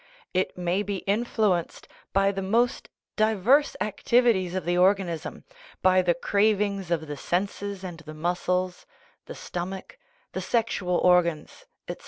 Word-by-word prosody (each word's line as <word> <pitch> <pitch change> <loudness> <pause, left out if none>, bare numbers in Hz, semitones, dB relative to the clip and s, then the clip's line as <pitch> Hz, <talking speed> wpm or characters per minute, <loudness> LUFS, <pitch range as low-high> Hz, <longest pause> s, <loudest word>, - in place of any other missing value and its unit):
It 185 0 -1
may 180 +2 0
be 200 -2 -4
influenced 205 -4 0 0.2
by 195 0 +3
the 195 -1 -4
most 235 +7 0 0.3
diverse 220 +7 +3
activities 215 -4 +2
of 185 - -3
the 175 +1 +1
organism, 180 -2 +1 0.4
by 185 0 +5
the 175 -2 +1
cravings 200 0 +1
of 165 -2 -1
the 145 -1 -6
senses 195 +4 -3
and 175 -3 -7
the 155 -1 -10
muscles, 180 +2 -2 0.4
the - - -8
stomach, 190 - -6 0.3
the - - -4
sexual 200 -6 0
organs, 175 -3 +1 0.2
etc. - - -5
185 Hz, 135 wpm, -26 LUFS, 175-205 Hz, 0.4 s, by